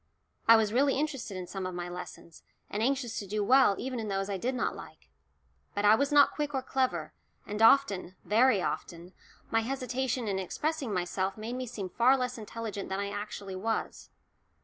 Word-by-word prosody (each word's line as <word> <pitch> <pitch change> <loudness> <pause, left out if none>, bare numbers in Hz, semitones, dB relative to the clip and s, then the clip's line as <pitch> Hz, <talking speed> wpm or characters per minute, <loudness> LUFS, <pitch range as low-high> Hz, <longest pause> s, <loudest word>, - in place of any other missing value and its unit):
I 230 - +9
was 220 -1 +2
really 275 +2 +3
interested 270 -10 -3
in 185 - -5
some 190 +1 -5
of 185 - -6
my 175 0 -4
lessons, 175 -2 -9 0.3
and 205 - -2
anxious 255 -1 0
to 200 - -7
do 210 +2 -1
well 255 -2 +5
even 255 -1 -4
in 220 - -4
those 195 0 -2
I 195 - -1
did 250 +7 -2
not 250 - -1
like. - - -13 0.6
But 205 0 0
I 210 - +8
was 280 +6 +2
not 290 -1 +6
quick 295 -1 -3
or 265 - -1
clever, 260 -1 -1 0.3
and 210 +1 -4
often, 210 -7 +4
very 225 -2 +4
often, 175 +2 -5 0.4
my 225 - +3
hesitation 255 -1 -2
in 195 -2 -1
expressing 290 - -2
myself 185 +1 -1
made 220 +3 -5
me 255 0 -4
seem 210 -5 -5
far 250 +8 +4
less 250 -1 -3
intelligent 215 -2 -6
than 190 +1 -2
I 200 0 -3
actually 205 -2 -6
was. 225 +4 -3
220 Hz, 195 wpm, -30 LUFS, 195-260 Hz, 0.6 s, I